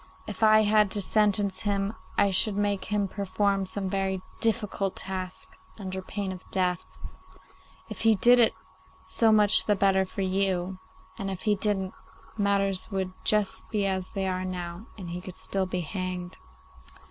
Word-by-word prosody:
If - - -7
I 215 0 +6
had 210 -1 +4
to - - 0
sentence 205 -2 +2
him 200 0 -1 0.2
I 200 - +4
should 200 +2 +1
make 205 -2 0
him 205 -1 0
perform 200 0 -1
some 195 +1 -3
very 190 0 -1 0.2
difficult 205 -3 0
task, 185 -1 -3 0.2
under 190 -2 -5
pain 195 0 -4
of 185 0 -8
death. 180 -2 0 1.0
If - - -7
he 225 -1 +5
did 245 +5 +6
it 230 - +5 0.5
so 225 -1 +3
much 210 -1 +5
the 210 - +4
better 190 -1 +3
for 195 +1 -4
you, 190 -1 0 0.4
and 195 - -3
if 190 -1 -6
he 210 - +3
didn't, 195 -2 -1 0.4
matters 200 -2 +1
would 190 -2 -3
just 215 +1 +2
be 210 -2 0
as 190 -1 -1
they 195 -2 -3
are 185 0 -2
now 180 +2 -5
and 180 -4 -7
he 175 +1 -5
could 185 0 -9
still 190 -1 0
be 180 -1 -2
hanged. 185 +1 -4
195 Hz, 165 wpm, -27 LUFS, 185-205 Hz, 1.0 s, I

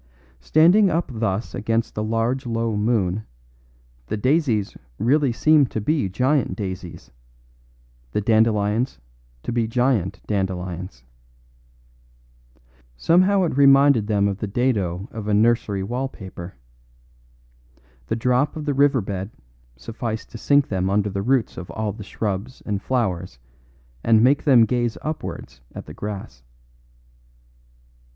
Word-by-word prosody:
Standing 175 - +4
up 165 -3 -1
thus 110 -1 -2
against 115 +2 -1
the 105 - -3
large 115 +4 -1
low 115 -1 -1
moon, 105 -2 0 0.8
the - - -2
daisies 125 -4 +1 0.2
really 135 +4 +2
seemed 150 +3 +3
to - - -3
be 135 -1 0
giant 125 +1 +1
daisies, 95 -3 -7 1.0
the - - 0
dandelions 110 +2 +1 0.5
to - - -3
be 115 -1 0
giant 115 -6 0
dandelions. 90 - -4 1.9
Somehow 185 - +3
it 165 - -1
reminded 140 -5 +5
them 100 -2 +2
of 100 -1 -3
the 105 - -3
dado 100 -5 -1
of 110 -2 -7
a 105 - +2
nursery 105 -3 +2
wall 125 +6 -2
paper. 95 -5 -10 1.5
The - - -1
drop 125 +5 +1
of 155 -1 -5
the 145 - 0
river 140 -2 +3
bed 95 0 -5 0.5
sufficed 110 - -5
to 115 - -8
sink 145 +2 +3
them 95 -1 -1
under 105 +1 +1
the 100 0 -2
roots 125 +2 0
of 90 - -7
all 110 -2 -3
shrubs 105 +4 -4
and 100 -2 -2
flowers 95 - -2 0.7
and 110 -1 +4
make 140 +3 +3
them 125 -6 +6
gaze 120 0 -1
upwards 150 - -6
at - - -7
the - - -10
grass. 100 -11 -7
110 Hz, 130 wpm, -22 LUFS, 100-130 Hz, 1.9 s, them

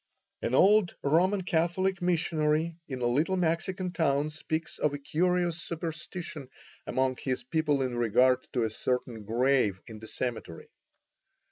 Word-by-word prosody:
An 125 - 0
old 200 +2 +5
Roman 185 +7 +2
Catholic 185 +2 0
missionary 165 -2 +1
in 130 -3 -5
a - - +1
little 150 +10 +1
Mexican 180 +2 -1
town 155 -3 +1
speaks 160 +1 -4
of 145 -1 +1
a - - -3
curious 175 +3 0
superstition 165 -3 -6 0.4
among 130 0 0
his 130 -2 -3
people 150 -4 +1
in 125 -2 -2
regard 125 +2 +3
to 125 - +1
a 110 - 0
certain 120 -1 -2
grave 120 -3 +2
in 110 -2 -9
the 110 - -10
cemetery. 115 -11 -5
150 Hz, 140 wpm, -29 LUFS, 130-175 Hz, 0.4 s, old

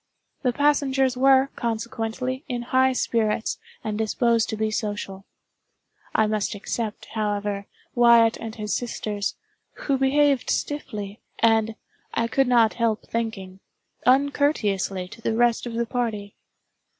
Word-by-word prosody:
The 250 - +2
passengers 270 -1 +2
were, 265 +1 +4
consequently, 235 +3 -3
in 240 -1 -2
high 260 0 +5
spirits 225 -3 0 0.2
and 215 -1 -3
disposed 230 +1 +1
to 220 - -3
be 215 0 0
social. 205 -3 -4 0.9
I 220 - +4
must 215 0 -1
except, 215 +1 -4
however, 205 -2 -2 0.3
Wyatt 235 -1 +6
and 225 -1 -7
his 210 -2 -3
sisters, 210 -4 -3 0.4
who 275 -2 -1
behaved 275 -1 +3
stiffly, 210 -8 -3 0.2
and, 225 -1 +3 0.4
I 230 - +1
could 270 +3 +2
not 235 -3 +4
help 230 -2 0
thinking, 195 -5 -3 0.5
uncourteously 250 -9 +2
to 225 - -13
the 225 - -1
rest 240 0 +2
of 235 - -5
the 235 +1 0
party. 225 -5 -3
230 Hz, 125 wpm, -24 LUFS, 215-255 Hz, 0.9 s, Wyatt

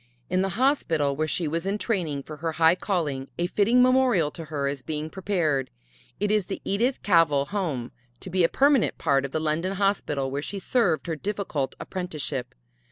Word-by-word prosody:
In 185 0 +2
the 195 +1 -2
hospital 165 - +2
where 155 +2 -1
she 165 +1 -1
was 165 +4 -2
in 200 +2 0
training 170 - -2
for 155 +1 -9
her 165 +1 -3
high 160 +1 +5
calling 155 -9 -2
a 175 - 0
fitting 225 +7 +3
memorial 250 - +3
to 165 - -8
her 145 -3 -2
is 140 -1 -3
being 155 +3 -4
prepared 170 -9 0 0.5
it 205 +1 +1
is 210 -3 +1
the 195 - -4
Edith 235 +7 0
Cavell 165 -7 +4
Home 155 - -2 0.3
to 185 - -9
be 185 0 +2
a 165 - +4
permanent 280 -3 +3
part 140 -4 +2
of 140 - -6
the 160 - -1
London 160 +4 0
Hospital 185 -9 0
where 140 +1 -2
she 200 - -5
served 195 - +1
her 165 - -2
difficult 165 -7 -3
apprenticeship. 150 -8 -4
165 Hz, 190 wpm, -26 LUFS, 150-200 Hz, 0.5 s, high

